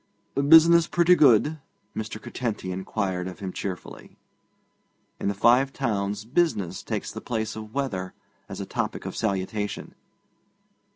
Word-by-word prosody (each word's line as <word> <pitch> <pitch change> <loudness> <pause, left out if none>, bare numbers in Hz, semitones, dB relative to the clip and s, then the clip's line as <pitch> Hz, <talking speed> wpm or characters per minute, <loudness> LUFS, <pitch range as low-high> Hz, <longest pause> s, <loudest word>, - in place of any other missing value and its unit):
'Business 165 +4 +6
pretty 175 +1 +4
good?' 150 0 +4 0.4
Mr. 110 0 -5
Curtenty 110 -6 -4
inquired 95 -1 -2
of 90 - -7
him 95 -2 -6
cheerfully. 95 -3 -7 1.0
In - - -2
the 100 - 0
Five 125 +6 +4
Towns 105 -6 -2
business 115 - 0
takes - - -4
the - - -7
place 110 -2 -3
of 110 +1 -9
weather 95 -10 -3 0.3
as 95 - -7
a 100 - -4
topic - - -3
of - - -5
salutation. 105 0 -2
110 Hz, 130 wpm, -25 LUFS, 95-135 Hz, 1.0 s, Business